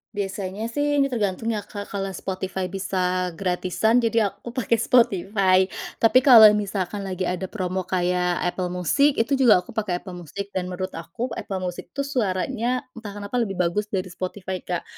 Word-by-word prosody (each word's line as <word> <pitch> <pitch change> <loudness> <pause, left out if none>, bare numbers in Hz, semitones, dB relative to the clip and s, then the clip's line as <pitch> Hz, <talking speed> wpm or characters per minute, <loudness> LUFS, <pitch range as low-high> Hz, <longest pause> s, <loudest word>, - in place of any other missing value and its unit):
Biasanya 200 +1 -3
sih 290 +4 0
ini 275 - +4
tergantung 225 -3 -2
ya 205 - -3
Kak, 205 -1 -8
kalau 195 -1 -3
Spotify 190 0 -4
bisa 185 -1 -1
gratisan 185 +5 0
jadi 225 -2 +2
aku 235 +4 -9
pakai 240 -2 +1
Spotify 195 -5 +3 0.4
tapi 230 +3 +7
kalau 230 -5 +9
misalkan 205 -1 -2
lagi 185 0 -3
ada 180 +1 -2
promo 185 -2 -3
kayak 180 -1 0
Apple 180 0 -1
Music 280 - +3
itu 270 +4 +1
juga 220 -8 +6
aku - - -12
pakai 200 -5 -2
Apple 185 - -8
Music 200 +5 -7
dan 185 -2 -2
menurut 185 +1 -4
aku 225 +10 -5
Apple 190 -4 -4
Music 180 -1 -5
itu 280 - 0
suaranya 245 0 -1
entah 220 -3 -8
kenapa 205 +4 -3
lebih 205 -5 -1
bagus 180 +4 0
dari 185 -3 -3
Spotify 185 +1 -5
Kak, 175 -1 -4
195 Hz, 170 wpm, -24 LUFS, 185-225 Hz, 0.4 s, kalau